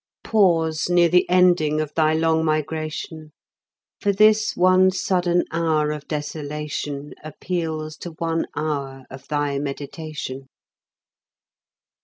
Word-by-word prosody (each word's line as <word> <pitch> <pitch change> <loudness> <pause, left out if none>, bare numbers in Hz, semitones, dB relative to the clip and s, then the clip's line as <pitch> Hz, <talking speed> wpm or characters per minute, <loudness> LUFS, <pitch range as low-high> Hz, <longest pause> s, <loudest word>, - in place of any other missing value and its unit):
Pause 165 -7 +2
near 175 -1 +4
the 180 +1 +3
ending 175 -4 +3
of 155 -1 -3
thy 155 0 +2
long 160 0 +2
migration; 155 0 -3 0.7
For 205 - +1
this 215 +2 +3
one 185 +1 +5
sudden 180 -2 +1
hour 160 -2 +1
of 150 -1 -6
desolation 150 -1 -5
Appeals 155 -1 -4
to 175 - -8
one 165 0 -2
hour 140 -3 -3
of 135 0 -11
thy 145 -2 -1
meditation. 140 -1 -6
155 Hz, 110 wpm, -22 LUFS, 150-175 Hz, 0.7 s, one